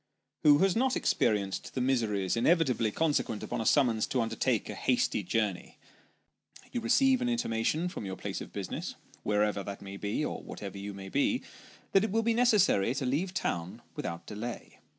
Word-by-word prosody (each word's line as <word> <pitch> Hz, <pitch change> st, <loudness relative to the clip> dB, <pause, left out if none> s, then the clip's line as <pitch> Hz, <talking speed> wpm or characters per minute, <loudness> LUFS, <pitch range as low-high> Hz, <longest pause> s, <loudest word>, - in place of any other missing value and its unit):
Who 145 Hz, -1 st, +7 dB
has 195 Hz, -, +1 dB
not 260 Hz, +2 st, +2 dB
experienced 100 Hz, -3 st, 0 dB
the -, -, 0 dB
miseries 115 Hz, -7 st, +1 dB
inevitably 125 Hz, -4 st, +3 dB
consequent 145 Hz, -4 st, 0 dB
upon 120 Hz, -1 st, -3 dB
a 110 Hz, -, -1 dB
summons 120 Hz, -7 st, +3 dB
to 135 Hz, -3 st, 0 dB
undertake 115 Hz, -1 st, 0 dB
a -, -, -5 dB
hasty -, -, +1 dB
journey? 105 Hz, -5 st, -2 dB, 0.9 s
You 240 Hz, -, -2 dB
receive 260 Hz, +2 st, +4 dB
an 245 Hz, -, +1 dB
intimation 160 Hz, -, 0 dB
from 180 Hz, -, -6 dB
your 95 Hz, -, -4 dB
place -, -, -5 dB
of -, -, -8 dB
business -, -, -5 dB, 0.3 s
wherever 105 Hz, -1 st, +1 dB
that 100 Hz, 0 st, -6 dB
may 100 Hz, 0 st, -8 dB
be, 100 Hz, 0 st, -1 dB
or -, -, -4 dB
whatever 100 Hz, -1 st, -7 dB
you 100 Hz, 0 st, -6 dB
may 95 Hz, 0 st, -8 dB
be 145 Hz, -, +1 dB, 0.5 s
that 195 Hz, -, +5 dB
it 220 Hz, -, 0 dB
will 225 Hz, +3 st, +1 dB
be 230 Hz, 0 st, +2 dB
necessary 210 Hz, -, +3 dB
to 135 Hz, -1 st, -2 dB
leave 150 Hz, +9 st, 0 dB
town 85 Hz, -, -3 dB
without 85 Hz, 0 st, -5 dB
delay. 115 Hz, +3 st, -7 dB
120 Hz, 175 wpm, -30 LUFS, -, 0.9 s, Who